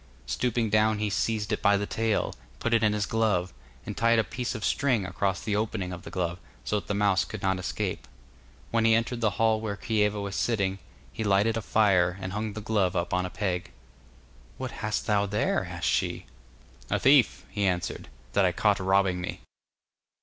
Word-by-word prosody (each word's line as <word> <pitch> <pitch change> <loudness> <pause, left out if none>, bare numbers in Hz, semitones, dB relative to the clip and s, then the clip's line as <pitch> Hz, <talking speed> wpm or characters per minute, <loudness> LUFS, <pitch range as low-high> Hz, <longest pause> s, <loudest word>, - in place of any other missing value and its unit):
Stooping 120 -3 0
down 110 0 +3
he 105 -1 -1
seized 110 +1 -1
it 105 - -1
by 100 0 +4
the 100 - -2
tail, 110 0 0
and - - -25
put 115 - -1
it 115 - +4
in 105 -1 +3
his 105 -1 0
glove, 100 -7 0 0.3
and 105 - -5
tied 115 +1 +3
a 110 - +4
piece 125 +2 -4
of 110 - -3
string 125 -8 +1
across 95 +1 -1
the 105 - -1
opening 105 -4 -2
of 90 - -7
the - - -9
glove, 90 -1 -2 0.2
so 105 - 0
that 85 - -14
the 100 - -1
mouse 100 -2 +3
could 110 - -8
not 95 -1 +1
escape. 95 - -3 0.6
When 115 -1 +2
he 115 0 +5
entered 115 +1 -1
the 110 - +3
hall 110 -1 +3
where 105 -2 -3
Kieva 105 -2 +1
was 100 -1 -4
sitting, 100 -4 0 0.3
he 110 - -3
lighted 105 +2 +3
a 115 - -1
fire, 95 -4 +3
and 95 0 -5
hung 105 0 -3
the 110 - -6
glove 100 -4 +1
up 85 0 -1
on 90 0 +1
a - - -8
peg. 90 -3 -2 0.9
'What 130 -1 -4
hast 105 -1 -3
thou 105 -2 +2
there?' 105 +1 0
asked - - -5
she. - - 0 0.6
'A - - +2
thief,' 135 -2 +4
he 100 -2 0
answered, 90 -2 -2 0.2
'that - - +4
I - - +3
caught - - +2
robbing 95 -1 +2
me. 90 - -5
105 Hz, 205 wpm, -27 LUFS, 95-110 Hz, 0.9 s, he